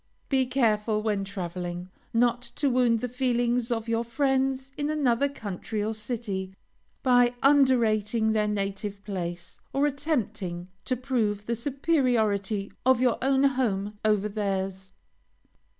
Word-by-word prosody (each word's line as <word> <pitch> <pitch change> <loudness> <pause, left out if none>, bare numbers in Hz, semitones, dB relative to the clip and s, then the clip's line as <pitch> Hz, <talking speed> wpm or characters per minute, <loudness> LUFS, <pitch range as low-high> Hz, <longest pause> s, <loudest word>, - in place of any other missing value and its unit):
Be 265 -2 +2
careful, 215 -4 +1
when 210 -3 0
traveling, 180 -2 -5 0.2
not 240 +1 +2
to 280 -3 +1
wound 240 -3 +3
the 250 - -1
feelings 245 -1 0
of 225 -1 -1
your 230 0 +1
friends 265 +1 0
in 290 0 -2
another 280 -3 +2
country 210 -3 -4
or 220 +1 -1
city, 210 -4 -4 0.5
by 245 -2 +5
underrating 230 -6 +3
their 215 -1 +2
native 200 0 -3
place, 175 -3 -5
or 275 +1 +2
attempting 235 - -2 0.2
to 255 - 0
prove 225 -5 -1
the 235 - -1
superiority 230 -7 0
of 260 -1 +4
your 250 -2 +2
own 270 +1 +3
home 210 -7 0
over 210 -1 +2
theirs. 195 -2 -3
225 Hz, 130 wpm, -27 LUFS, 200-260 Hz, 0.5 s, by